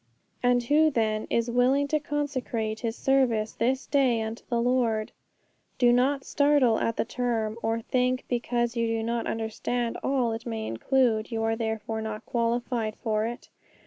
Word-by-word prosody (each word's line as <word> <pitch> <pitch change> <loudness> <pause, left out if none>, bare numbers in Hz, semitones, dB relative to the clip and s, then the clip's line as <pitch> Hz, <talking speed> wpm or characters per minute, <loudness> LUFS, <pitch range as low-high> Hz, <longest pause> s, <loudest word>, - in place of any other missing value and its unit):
'And 245 0 +3
who, 300 +5 +4
then, 220 -5 0
is 235 +1 0
willing 260 +4 +3
to 305 - +2
consecrate 260 -7 -2
his 230 -1 -3
service 245 -6 +2
this 260 +3 0
day 255 -6 +2
unto 220 +1 -6
the 235 -2 +1
Lord?' 235 -3 +1 0.7
'Do 240 -1 +5
not 270 +3 +2
startle 285 -6 +3
at 230 - 0
the - - +1
term, 230 -3 -1
or 225 +1 -1
think, 255 +2 0
because 240 0 -1
you 230 -1 +1
do 225 0 -1
not 235 +1 -2
understand 230 +2 -2
all 255 -4 +1
it 225 +2 -5
may 220 -1 -3
include, 225 - +1
you 225 -1 -1
are 225 0 +1
therefore 220 -1 -3
not 220 0 -5
qualified 235 -1 -1
for 215 -1 -1
it. 240 +1 -8
235 Hz, 165 wpm, -27 LUFS, 225-255 Hz, 0.7 s, Do